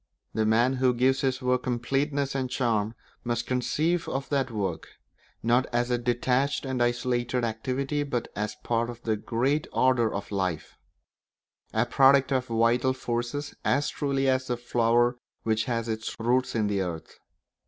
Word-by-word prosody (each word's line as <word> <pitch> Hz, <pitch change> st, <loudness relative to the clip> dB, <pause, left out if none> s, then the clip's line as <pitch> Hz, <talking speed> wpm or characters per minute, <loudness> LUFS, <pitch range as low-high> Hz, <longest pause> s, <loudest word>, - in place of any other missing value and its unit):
The 110 Hz, -1 st, +1 dB
man 120 Hz, +4 st, +3 dB
who 125 Hz, -1 st, +3 dB
gives 130 Hz, +2 st, +2 dB
his 130 Hz, -1 st, -1 dB
work 125 Hz, 0 st, +2 dB
completeness 135 Hz, +3 st, -1 dB
and 130 Hz, -2 st, -2 dB
charm 115 Hz, -4 st, 0 dB, 0.3 s
must 120 Hz, 0 st, -1 dB
conceive 155 Hz, +7 st, 0 dB
of 135 Hz, +1 st, -3 dB
that 135 Hz, -3 st, +1 dB
work, 100 Hz, -7 st, -3 dB, 0.6 s
not 120 Hz, +3 st, +3 dB
as 120 Hz, +1 st, 0 dB
a 120 Hz, -, +2 dB
detached 125 Hz, +4 st, 0 dB
and 130 Hz, -2 st, -2 dB
isolated 120 Hz, 0 st, 0 dB
activity, 130 Hz, +6 st, -1 dB
but 125 Hz, -5 st, -2 dB
as 105 Hz, +1 st, -3 dB
part 115 Hz, 0 st, 0 dB
of 120 Hz, 0 st, -9 dB
the 110 Hz, -1 st, +1 dB
great 125 Hz, +8 st, 0 dB
order 130 Hz, -4 st, +3 dB
of 100 Hz, +1 st, -5 dB
life; 95 Hz, -5 st, -2 dB, 1.0 s
a 110 Hz, +2 st, +2 dB
product 135 Hz, +2 st, +5 dB
of 130 Hz, -1 st, +1 dB
the 115 Hz, -, -3 dB
vital 120 Hz, +3 st, +3 dB
forces 120 Hz, +3 st, -3 dB
as 145 Hz, +2 st, +2 dB
truly 135 Hz, -1 st, 0 dB
as 130 Hz, 0 st, +1 dB
the 120 Hz, -, -1 dB
flower 120 Hz, 0 st, +2 dB, 0.3 s
which 110 Hz, -1 st, +1 dB
has 115 Hz, -2 st, -2 dB
its 110 Hz, 0 st, -3 dB
roots 125 Hz, +3 st, +1 dB
in 110 Hz, -2 st, +2 dB
the 100 Hz, -1 st, 0 dB
earth. 85 Hz, -3 st, -6 dB
120 Hz, 165 wpm, -27 LUFS, 115-130 Hz, 1.0 s, product